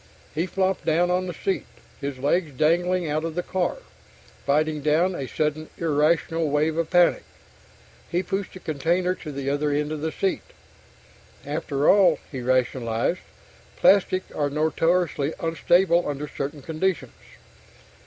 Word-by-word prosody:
He 165 Hz, +4 st, -1 dB
flopped 190 Hz, 0 st, 0 dB
down 175 Hz, +3 st, +2 dB
on 185 Hz, +1 st, 0 dB
the -, -, -3 dB
seat, 195 Hz, +4 st, -2 dB, 0.3 s
his 140 Hz, -2 st, -4 dB
legs 145 Hz, +3 st, 0 dB
dangling 175 Hz, +3 st, +2 dB
out 155 Hz, +1 st, -1 dB
of 165 Hz, -1 st, -4 dB
the 180 Hz, -, -1 dB
car, 185 Hz, -, -1 dB, 0.7 s
fighting 150 Hz, +1 st, +1 dB
down 160 Hz, +5 st, +2 dB
a 135 Hz, -6 st, -4 dB
sudden 155 Hz, +2 st, -2 dB
irrational 160 Hz, 0 st, +1 dB
wave 150 Hz, +2 st, +1 dB
of 165 Hz, -1 st, -1 dB
panic. 175 Hz, -1 st, +4 dB, 0.9 s
He 175 Hz, +2 st, 0 dB
pushed 195 Hz, 0 st, -3 dB
the 185 Hz, -, -9 dB
container 170 Hz, +4 st, 0 dB
to 155 Hz, -4 st, -8 dB
the 140 Hz, -1 st, -5 dB
other 145 Hz, +1 st, 0 dB
end 150 Hz, +1 st, -1 dB
of 155 Hz, -1 st, -4 dB
the 160 Hz, +1 st, -1 dB
seat. 190 Hz, +3 st, -1 dB, 1.0 s
After 145 Hz, -1 st, -1 dB
all, 195 Hz, -2 st, +6 dB
he 130 Hz, -4 st, -5 dB
rationalized, 125 Hz, +3 st, 0 dB, 0.6 s
_plastics 190 Hz, -1 st, +3 dB
are 145 Hz, -1 st, 0 dB
notoriously 160 Hz, 0 st, +1 dB
unstable 170 Hz, +1 st, +2 dB
under 145 Hz, +1 st, -4 dB
certain 145 Hz, 0 st, -5 dB
conditions. 165 Hz, +4 st, -2 dB
160 Hz, 145 wpm, -24 LUFS, 145-180 Hz, 1.0 s, all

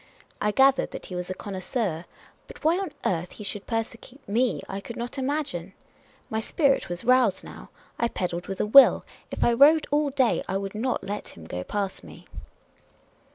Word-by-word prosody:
I 210 Hz, -, +2 dB
gathered 265 Hz, +4 st, +4 dB
that -, -, -8 dB
he 180 Hz, -, -7 dB
was 180 Hz, 0 st, -4 dB
a 185 Hz, -, -3 dB
connoisseur; 190 Hz, -3 st, -3 dB, 0.4 s
but -, -, -13 dB
why 330 Hz, +4 st, +3 dB
on 390 Hz, -5 st, -4 dB
earth 175 Hz, -1 st, -1 dB
he 210 Hz, -, -9 dB
should 205 Hz, 0 st, -5 dB
persecute 230 Hz, +4 st, -5 dB
me 235 Hz, +5 st, 0 dB
I 195 Hz, +1 st, -5 dB
could 235 Hz, -, -8 dB
not 240 Hz, +3 st, -5 dB
imagine. 260 Hz, -, -3 dB, 0.5 s
My 220 Hz, -, -2 dB
spirit 275 Hz, -, +1 dB
was 175 Hz, +3 st, -4 dB
roused 255 Hz, +1 st, +3 dB
now— -, -, -11 dB, 0.3 s
I 235 Hz, -, +2 dB
pedalled 175 Hz, -5 st, -4 dB
with 195 Hz, -, -5 dB
a -, -, +1 dB
will; 265 Hz, +6 st, +7 dB, 0.2 s
if -, -, -2 dB
I 240 Hz, -, +4 dB
rode 295 Hz, +6 st, +6 dB
all 295 Hz, 0 st, +2 dB
day 265 Hz, -3 st, +2 dB
I 190 Hz, -, -1 dB
would 195 Hz, 0 st, -5 dB
not 240 Hz, +4 st, -2 dB
let 205 Hz, +1 st, -6 dB
him 80 Hz, -, -11 dB
go 90 Hz, +2 st, -5 dB
past 200 Hz, -, -3 dB
me. -, -, -13 dB
225 Hz, 190 wpm, -26 LUFS, 190-265 Hz, 0.5 s, will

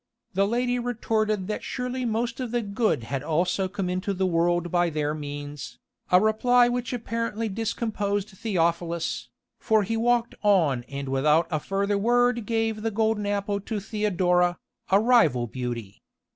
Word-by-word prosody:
The 195 Hz, +2 st, +2 dB
lady 245 Hz, +2 st, 0 dB
retorted 215 Hz, -4 st, -1 dB
that 210 Hz, -, -3 dB
surely 250 Hz, 0 st, -3 dB
most 235 Hz, +2 st, -1 dB
of 255 Hz, -2 st, -3 dB
the 240 Hz, 0 st, -1 dB
good 205 Hz, -, 0 dB
had 130 Hz, +3 st, -3 dB
also 175 Hz, +5 st, 0 dB
come 190 Hz, 0 st, -3 dB
into 185 Hz, +2 st, -2 dB
the 190 Hz, +1 st, 0 dB
world 175 Hz, 0 st, +1 dB
by 175 Hz, -1 st, +2 dB
their 150 Hz, -1 st, -1 dB
means, 145 Hz, -2 st, -7 dB, 0.3 s
a 180 Hz, -, +7 dB
reply 240 Hz, +4 st, +4 dB
which 245 Hz, -1 st, -2 dB
apparently 230 Hz, -2 st, -2 dB
discomposed 210 Hz, -1 st, -2 dB
Theophilus, 170 Hz, -4 st, -1 dB, 0.3 s
for 220 Hz, -1 st, +2 dB
he 225 Hz, +4 st, -2 dB
walked 235 Hz, +1 st, +1 dB
on 160 Hz, -, +3 dB
and 140 Hz, 0 st, -5 dB
without 150 Hz, +5 st, +3 dB
a 155 Hz, -, 0 dB
further 200 Hz, +4 st, -1 dB
word 240 Hz, 0 st, +2 dB
gave 225 Hz, -1 st, 0 dB
the 225 Hz, -, 0 dB
golden 220 Hz, -1 st, 0 dB
apple 200 Hz, 0 st, -1 dB
to 215 Hz, +1 st, -3 dB
Theodora, 180 Hz, -4 st, +1 dB, 0.3 s
a 195 Hz, -, +5 dB
rival 210 Hz, -, +4 dB
beauty. 120 Hz, -4 st, -6 dB
200 Hz, 155 wpm, -26 LUFS, 170-225 Hz, 0.3 s, a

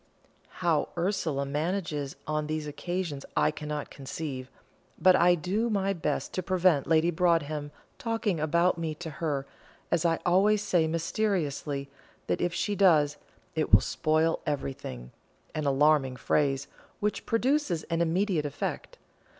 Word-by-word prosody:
How 165 Hz, -3 st, +2 dB
Ursula 170 Hz, -6 st, 0 dB
manages 150 Hz, -1 st, -2 dB
on 155 Hz, 0 st, -1 dB
these 155 Hz, 0 st, -2 dB
occasions 155 Hz, -1 st, -4 dB
I -, -, +4 dB
cannot 150 Hz, -1 st, -5 dB
conceive, 135 Hz, -2 st, -6 dB, 0.5 s
but 185 Hz, 0 st, +6 dB
I 175 Hz, 0 st, +5 dB
do 195 Hz, +8 st, -1 dB
my 195 Hz, -2 st, +1 dB
best 170 Hz, -, -2 dB
to 185 Hz, -, -1 dB
prevent 180 Hz, -5 st, +2 dB
Lady 165 Hz, +1 st, +3 dB
Broadhem 155 Hz, -4 st, +1 dB, 0.3 s
talking 225 Hz, -, -1 dB
about 170 Hz, +3 st, +2 dB
me 160 Hz, -2 st, -2 dB
to 165 Hz, +1 st, -6 dB
her, 145 Hz, -4 st, -1 dB, 0.5 s
as 165 Hz, -, +2 dB
I 165 Hz, -1 st, +2 dB
always 200 Hz, +4 st, +4 dB
say 175 Hz, -5 st, +2 dB
mysteriously, 160 Hz, -5 st, -1 dB, 0.4 s
that -, -, -1 dB
if 175 Hz, -, +1 dB
she 205 Hz, +4 st, -1 dB
does, 155 Hz, -7 st, +4 dB, 0.4 s
"it -, -, -1 dB
will -, -, +9 dB
spoil 155 Hz, +1 st, +1 dB
everything" 130 Hz, -, -4 dB, 0.4 s
an 155 Hz, -2 st, -2 dB
alarming 140 Hz, -1 st, +3 dB
phrase, 135 Hz, +1 st, +1 dB, 0.3 s
which 210 Hz, 0 st, -2 dB
produces 230 Hz, -, +1 dB
an 165 Hz, 0 st, -1 dB
immediate 170 Hz, -2 st, +1 dB
effect. 140 Hz, -, -5 dB
160 Hz, 135 wpm, -28 LUFS, 150-185 Hz, 0.5 s, will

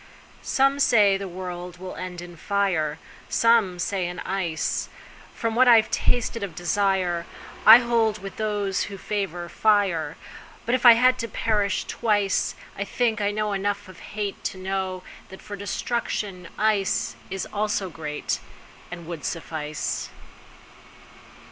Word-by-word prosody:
SOME 275 Hz, +1 st, +2 dB
say 210 Hz, -7 st, +5 dB
the 195 Hz, 0 st, -4 dB
world 180 Hz, -1 st, -7 dB
will 185 Hz, +1 st, -7 dB
end 180 Hz, -1 st, -6 dB
in 175 Hz, 0 st, -11 dB
fire, 175 Hz, -5 st, 0 dB, 0.3 s
Some 230 Hz, -6 st, +3 dB
say 185 Hz, 0 st, -1 dB
in 175 Hz, 0 st, -6 dB
ice. 180 Hz, -5 st, -2 dB, 0.5 s
From 230 Hz, -1 st, -1 dB
what 255 Hz, +3 st, +5 dB
I've 225 Hz, -2 st, +6 dB
tasted 235 Hz, -1 st, 0 dB
of 195 Hz, -5 st, -5 dB
desireI 180 Hz, -1 st, +1 dB, 0.4 s
hold 230 Hz, -1 st, +7 dB
with 195 Hz, -1 st, -9 dB
those 205 Hz, -3 st, -1 dB
who 200 Hz, -, -8 dB
favor 190 Hz, -4 st, -3 dB
fire. 185 Hz, -8 st, +1 dB, 0.5 s
But 235 Hz, -, 0 dB
if 255 Hz, -1 st, +4 dB
it 230 Hz, -1 st, +10 dB
had 255 Hz, +1 st, +4 dB
to 230 Hz, -, -2 dB
perish 210 Hz, -4 st, 0 dB
twice,I 205 Hz, -2 st, -1 dB
think 220 Hz, +1 st, 0 dB
I 205 Hz, -, +2 dB
know 210 Hz, 0 st, -1 dB
enough 205 Hz, +1 st, -2 dB
of 185 Hz, -2 st, -13 dB, 0.2 s
hateTo 205 Hz, -2 st, -3 dB
know 190 Hz, -1 st, -3 dB, 0.3 s
that 190 Hz, -, -11 dB
for 205 Hz, -, -7 dB
destruction 200 Hz, -2 st, -3 dB
iceIs 195 Hz, -2 st, 0 dB
also 205 Hz, -3 st, -1 dB
greatAnd 160 Hz, +2 st, -6 dB
would 165 Hz, -3 st, -7 dB
suffice. 155 Hz, -3 st, -3 dB
195 Hz, 130 wpm, -25 LUFS, 180-215 Hz, 0.5 s, it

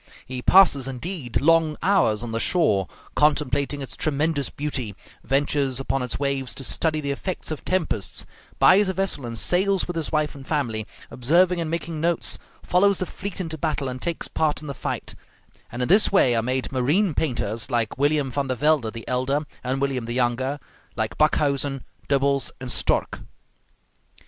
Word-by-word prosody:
He 130 Hz, 0 st, -5 dB
passes, 145 Hz, -6 st, +5 dB
indeed, 135 Hz, 0 st, -3 dB
long 160 Hz, 0 st, +3 dB
hours 170 Hz, -, +3 dB
on 120 Hz, -, -5 dB
the 115 Hz, -, -1 dB
shore, 115 Hz, -, +2 dB, 0.3 s
contemplating 145 Hz, -1 st, +1 dB
its 135 Hz, -, -6 dB
tremendous 150 Hz, -1 st, 0 dB
beauty, 135 Hz, -8 st, -4 dB, 0.3 s
ventures 135 Hz, -1 st, +1 dB
upon 135 Hz, 0 st, -1 dB
its 125 Hz, -2 st, -3 dB
waves 135 Hz, -4 st, -1 dB
to 135 Hz, -, -5 dB
study 155 Hz, +3 st, 0 dB
the 140 Hz, -1 st, -2 dB
effects 170 Hz, +4 st, -4 dB
of 155 Hz, -, -5 dB
tempests, 155 Hz, -, -1 dB, 0.3 s
buys 195 Hz, +1 st, +5 dB
a -, -, 0 dB
vessel 190 Hz, -10 st, -1 dB
and 115 Hz, -1 st, -5 dB
sails 190 Hz, -, +2 dB
with 175 Hz, -, -4 dB
his 165 Hz, -3 st, -3 dB
wife 150 Hz, -1 st, 0 dB
and 135 Hz, -1 st, -12 dB
family, 115 Hz, -8 st, -1 dB, 0.2 s
observing 170 Hz, +7 st, +2 dB
and 160 Hz, -, -3 dB
making 165 Hz, -1 st, -3 dB
notes, 170 Hz, 0 st, +1 dB, 0.2 s
follows 195 Hz, +2 st, +3 dB
the 185 Hz, -, -2 dB
fleet 195 Hz, +1 st, -6 dB
into 160 Hz, -4 st, -4 dB
battle 150 Hz, -3 st, -1 dB
and 125 Hz, 0 st, -5 dB
takes 170 Hz, -1 st, -2 dB
part 150 Hz, -4 st, 0 dB
in -, -, -9 dB
the 140 Hz, -, -4 dB
fight; -, -, -4 dB, 0.6 s
and 120 Hz, +2 st, -3 dB
in -, -, -1 dB
this 205 Hz, +4 st, +5 dB
way 130 Hz, -11 st, +4 dB
are 115 Hz, -, +2 dB
made 130 Hz, +2 st, -2 dB
marine 150 Hz, +9 st, +2 dB
painters 115 Hz, -6 st, -1 dB
like 120 Hz, -1 st, -1 dB
William 145 Hz, -1 st, +2 dB
Van 140 Hz, +2 st, -1 dB
der 130 Hz, -, -1 dB
Velde 145 Hz, -5 st, +2 dB
the 115 Hz, 0 st, -9 dB
elder 130 Hz, +3 st, 0 dB, 0.2 s
and 130 Hz, +2 st, -1 dB
William 135 Hz, -3 st, -1 dB
the 120 Hz, -, -4 dB
younger, 130 Hz, +3 st, 0 dB, 0.4 s
like 110 Hz, -1 st, -2 dB
Backhuysen, 140 Hz, -3 st, +1 dB, 0.3 s
Dubbels, 140 Hz, 0 st, +2 dB
and 130 Hz, -2 st, -5 dB
Stork. -, -, 0 dB
140 Hz, 175 wpm, -24 LUFS, 125-160 Hz, 0.6 s, passes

